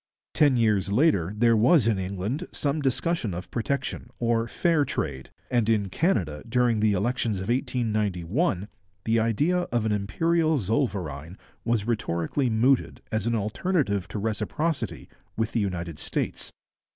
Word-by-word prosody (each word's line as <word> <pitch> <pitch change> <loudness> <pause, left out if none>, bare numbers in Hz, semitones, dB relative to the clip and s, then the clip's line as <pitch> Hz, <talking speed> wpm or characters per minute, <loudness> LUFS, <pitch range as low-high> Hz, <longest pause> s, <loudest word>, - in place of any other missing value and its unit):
Ten 145 -4 +4
years 105 -4 +2
later 105 - +3
there 115 +1 +4
was 125 +4 +5
in 110 -4 +2
England 100 - -3
some 145 +1 -1
discussion 135 - 0
of 90 - -7
protection 125 0 -2
or 115 -1 +1
'fair 165 +4 +2
trade,' 70 - -3 0.2
and 120 -3 +2
in 105 -3 +2
Canada, 90 - 0
during 120 -2 +2
the 105 -1 +3
elections 110 +1 0
of 95 +3 -5
1891, 110 - 0 0.4
the 115 0 +3
idea 130 - +2
of 120 -2 +1
an 110 - +1
imperial 160 +11 +1
zollverein 95 - -2 0.3
was 115 -3 0
rhetorically 115 - -1
mooted 120 +4 +2
as 110 0 -1
an 115 - +1
alternative 105 - 0
to - - -6
reciprocity 120 +9 -2 0.3
with 110 0 0
the 115 - 0
United 85 -6 -3
States. - - -3
110 Hz, 140 wpm, -26 LUFS, 100-130 Hz, 0.4 s, was